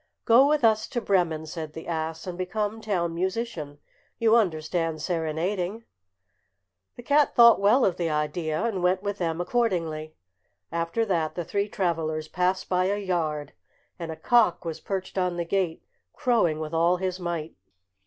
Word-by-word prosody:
"Go 245 +4 +6
with 300 -2 +2
us 220 -1 +3
to 245 - -2
Bremen," 175 -7 +1
said 155 -1 -6
the 160 - -8
ass, 160 0 -3
"and 180 -2 -5
become 205 +4 -3
town 180 -6 -1
musician. 180 -5 -3 0.4
You 225 0 +4
understand 165 -5 0
serenading." 175 +6 -2 1.1
The 245 - -10
cat 290 +3 +3
thought 235 -1 +8
well 225 +6 +5
of 180 -2 +1
the 170 -2 -1
idea, 155 +2 -1
and 220 -6 -1
went 185 +2 +1
with 205 0 -3
them 165 -2 -1
accordingly. 170 -7 -1 0.6
After 170 +7 -1
that 165 -6 -1
the 175 - -3
three 200 +4 -1
travellers 160 -5 -1
passed 180 +2 0
by 185 0 +1
a 200 +2 0
yard, 160 -7 -2 0.5
and 165 -1 -4
a - - -5
cock 215 +2 +2
was 165 -2 -4
perched 190 -1 -4
on 180 -1 0
the 170 - -2
gate 180 -2 -1 0.3
crowing 210 -11 +1
with 155 0 -5
all 170 +2 +3
his 185 0 -3
might. 170 -3 -4
180 Hz, 165 wpm, -26 LUFS, 160-205 Hz, 1.1 s, thought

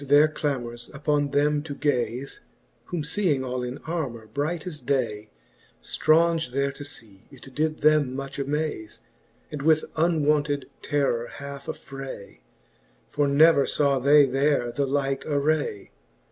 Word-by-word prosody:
They - - -10
ceaft - - -16
their 145 +2 +7
clamorSj 120 -6 -4
upon 145 0 0
them 145 +1 +2
to 145 -2 -7
gaze; 130 -2 -1 0.5
Whom 170 -4 -3
feeing 155 -4 +1
all 125 -1 -3
in 125 +2 -4
armour 140 -9 -3
bright 145 +9 -3
as 165 -5 -5
day, 110 -8 -1 0.5
Straunge 165 -4 +2
there 140 +1 +1
to 140 +1 -9
fee, 110 -9 -8
it 135 -1 -14
did 155 +2 -1
them 150 -4 +3
much 135 +1 -6
amaze. 140 -6 -3 0.5
And 150 - -5
with 155 +1 +3
uncounted 150 -3 +1
terror 135 -5 0
halfe 140 -1 -9
aflfray; 135 -7 -8 0.7
For 145 -1 +1
never 140 0 +5
faw 140 -2 +2
they 145 +2 +6
there 135 -2 +1
the 140 +3 -1
like 135 0 -1
array. 145 -7 0
140 Hz, 145 wpm, -25 LUFS, 130-150 Hz, 0.7 s, their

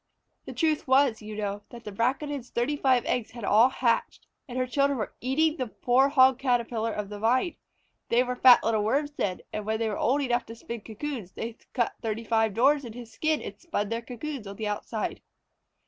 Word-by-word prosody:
The - - -7
truth 315 -4 0
was, 260 -4 +3
you 215 0 -7
know, 205 -1 -3
that 235 -1 -11
the 210 - -7
Braconid's 255 +4 -1
thirty 240 +5 0
five 260 -4 +2
eggs 245 -3 -1
had 235 -1 -10
all 220 +5 +5
hatched, 235 -3 0 0.2
and 250 -1 -6
her 255 - +1
children 275 +2 +1
were 215 - -4
eating 295 +6 +2
up 310 - -10
the 255 - -1
poor 260 +3 +3
Hog 260 -2 +5
Caterpillar 235 -3 0
of 210 -2 -4
the 205 0 -7
Vine. 255 - +1 0.5
They 240 +2 +4
were 250 0 -3
fat 250 -1 +7
little 220 -2 +1
Worms 285 +7 0
then, 190 -10 -2
and 210 - -3
when 220 +1 -1
they 225 0 -1
were 210 - -3
old 280 +5 +2
enough 245 -2 0
to 230 - -8
spin 230 0 -7
cocoons, 225 -3 -6
they 225 0 -5 0.2
cut 240 -3 0
thirty 225 0 -3
five 225 0 +2
tiny 195 - -12
doors 280 +4 +4
in 235 -3 -8
his 235 -1 -10
skin 310 -1 0
and - - -8
spun 210 - -3
their 230 +1 -2
cocoons 250 0 -6
on 200 - -7
the 215 +1 -4
outside. 210 +1 -3
240 Hz, 220 wpm, -27 LUFS, 220-265 Hz, 0.5 s, fat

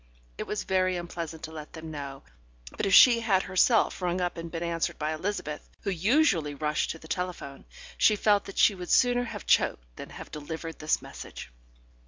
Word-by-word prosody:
It - - -6
was 210 - -3
very 185 -1 +1
unpleasant 170 -2 -6
to 160 - -6
let 155 -1 -9
them 160 -1 -8
know, 140 -2 -7 0.5
but - - -1
if 195 - +1
she 240 -2 +8
had 200 -5 +2
herself 190 +3 +2
rung 180 0 0
up 175 -1 -1
and 165 0 -6
been 165 0 -4
answered 170 -1 -2
by 155 +1 -2
Elizabeth, 155 -3 -4
who 200 - -2
usually 185 - +2
rushed 150 +1 -1
to - - -4
the 160 - -14
telephone, 175 -6 -5 0.3
she 215 - +5
felt 205 -1 +2
that 195 - -10
she - - +5
would 180 -2 -8
sooner 245 0 +3
have - - -7
choked - - +1
than - - -8
have - - -10
delivered 160 +2 -6
this 155 0 0
message. - - -9
170 Hz, 195 wpm, -28 LUFS, 155-195 Hz, 0.5 s, she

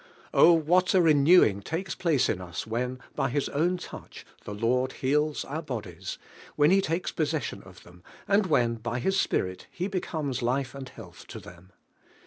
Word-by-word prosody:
O, 170 - +7
what 175 +3 +3
a - - +6
renewing 150 - +5
takes 170 - -4
place 160 -7 +1
in 90 - -2
us 85 -2 -6
when, 125 +3 -3 0.2
by 135 - -1
His 140 +2 -1
own 175 +5 0
touch, - - -10 0.2
the - - -6
Lord 125 +4 0
heals 150 +3 0
DIVINE - - -12
IIEALIKQ. - - -3
our - - -3
'bodies, 105 - -6 0.4
when 150 +2 +4
He 195 +1 +5
takes 170 -1 -2
possession 155 -3 -2
of - - -15
them, 90 0 -17 0.3
and 200 0 +3
when 120 -7 +2
by 115 +2 -4
His 190 +10 0
Spirit 90 0 -1
He 180 +2 -4
becomes 155 -9 -3
life 130 +3 -1
and 135 -2 -8
'health - - -13
to - - -8
them! 90 +2 -15
140 Hz, 185 wpm, -27 LUFS, 115-165 Hz, 0.4 s, O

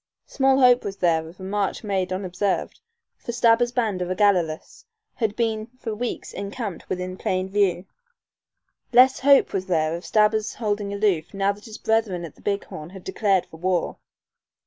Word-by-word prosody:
Small 270 -1 +2
hope 250 -1 +5
was 200 -1 -5
there 165 -3 +1
of 175 - -16
a - - -9
march 200 +2 -2
made 190 -3 -1
unobserved, 185 +1 -2 0.4
for - - -5
Stabber's 235 0 +3
band 220 -7 -1
of 180 - -2
Ogalallas 185 -5 0 0.3
had 220 -3 -1
been 220 -2 -1
for 225 -3 -5
weeks 240 +3 -4
encamped 200 -2 -6
within 185 0 -3
plain 185 0 -1
view. 190 -2 +1 1.1
Less 255 +2 +6
hope 280 +1 +5
was 190 -1 -2
there 160 -2 +1
of 170 - -7
Stabber's 215 0 +2
holding 205 -3 -2
aloof 200 -4 0
now 195 0 +2
that 205 +1 -11
his 220 -2 -9
brethren 215 -6 0
at 160 - -10
the - - -22
Big 200 0 -1
Horn 155 +1 -9
had 190 0 -11
declared 190 -1 +1
for 160 - -14
war. 180 0 -1
200 Hz, 170 wpm, -24 LUFS, 185-220 Hz, 1.1 s, Less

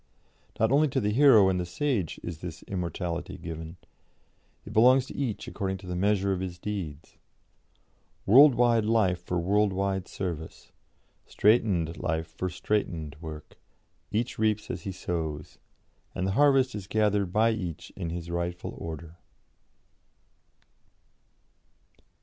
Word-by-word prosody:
Not 110 +2 +3
only 150 +3 +4
to 135 -1 -1
the 105 -3 0
hero 115 -5 +6
and 95 -1 +1
the 90 - -2
sage 100 - -1
is 85 -3 -6
this 85 -2 -8
immortality 85 -2 -4
given; 80 +1 -7 0.9
it 105 - -9
belongs 125 +4 +5
to - - -10
each 125 -7 -3
according 95 -1 -3
to 95 - -13
the 90 0 -4
measure 100 +1 +1
of 95 - -2
his 90 -1 -5
deeds; 85 -7 -6 1.1
world 135 +5 +8
wide 120 -2 +3
life 105 -5 +2
for 90 - -2
world 100 +4 +2
wide 95 0 -1
service; 85 -4 -6 0.6
straitened 95 -7 +2
life 80 -1 -2
for 80 +3 -4
straitened 85 -5 -2
work; 80 -2 -9 0.5
each 115 +2 -2
reaps 110 -1 0
as 85 -1 -7
he 95 - -2
sows, 80 -5 -4 0.6
and 95 - -1
the 95 - 0
harvest 135 +1 +4
is 100 -3 -6
gathered 105 -3 +1
by 110 +3 +3
each 90 -8 -5
in 85 - -4
his 85 0 -5
rightful 85 0 -3
order." 80 +1 -7
95 Hz, 140 wpm, -28 LUFS, 85-110 Hz, 1.1 s, world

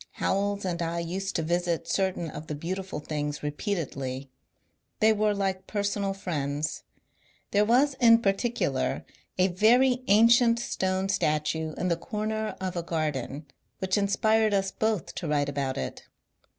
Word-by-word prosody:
Howells 200 0 -1
and 175 -2 -2
I 170 0 -2
used 185 +3 -3
to 165 - 0
visit 170 0 -1
certain 185 -4 -1
of 150 +1 -8
the 150 - -3
beautiful 185 +3 -4
things 150 -1 -4
repeatedly. 140 - -3 0.7
They 220 +1 +5
were 210 -1 +1
like 190 -1 -2
personal 200 -1 -1
friends. 150 -5 -3 0.7
There 205 +1 +4
was 260 +6 +4
in 230 -1 +7
particular 215 +5 0 0.3
a 185 +1 +3
very 245 +7 +4
ancient 230 +3 +6
stone 190 -4 -1
statue 155 -4 0
in 180 - -1
the 170 - +1
comer 215 -1 -3
of 185 -1 -3
a 170 - -1
garden 150 -3 -3 0.3
which 190 -1 0
inspired 215 +1 +2
us 195 -1 0
both 220 -5 -1
to 170 - -5
write 145 -1 +1
about 135 -2 -2
it. 65 - -5
190 Hz, 145 wpm, -27 LUFS, 155-210 Hz, 0.7 s, in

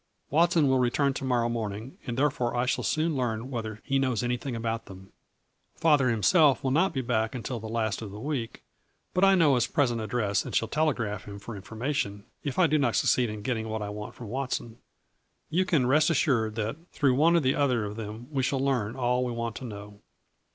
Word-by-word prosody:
Watson 165 0 +4
will 130 -1 +3
return 135 +3 +2
to 135 - -5
morrow 125 -3 +1
morning 115 +1 -4
and 120 0 -3
therefore 130 -4 +1
I 120 - +2
shall 130 - 0
soon 155 0 0
learn 125 -1 -2
whether 110 -3 -5
he 135 -1 +1
knows 130 -5 0
anything 125 +1 -2
about 115 0 -3
them. 95 0 -12 0.6
Father 145 -6 +3
himself 140 - +4
will 130 - +1
not 165 +8 +3
be 130 - -2
back 110 -1 -1
until 120 0 -4
the 110 0 -7
last 110 -2 -1
of 110 - -6
the 100 +2 -9
week, 130 -3 -4 0.5
but 185 - +2
I 195 0 +7
know 160 -6 +5
his 125 -1 +2
present 120 -4 +1
address 105 -2 0
and - - -6
shall 115 - +2
telegraph 120 -10 -1
him 100 -1 -8
for 105 +3 -8
information, 110 0 -3 0.2
if 140 -4 -3
I 185 - +5
do 155 -1 +2
not 140 - +1
succeed 125 -3 +3
in 105 -1 -6
getting 110 -2 -2
what 110 -1 -3
I 100 - -4
want 105 0 -7
from 120 -4 -9
Watson. 125 -2 -3 0.7
You 185 +4 +2
can 155 -8 +2
rest 150 +5 +4
assured 120 -9 +1
that 110 +4 -2
through 140 -4 +2
one 160 +6 +4
or - - +6
the 130 -2 +2
other 125 -6 +1
of 105 0 -5
them 110 +2 -7
we 135 -3 0
shall 135 +1 0
learn 130 -5 0
all 125 -1 +1
we 125 - -2
want 115 -1 -3
to 130 - -7
know. 105 -2 -9
125 Hz, 215 wpm, -28 LUFS, 110-140 Hz, 0.7 s, I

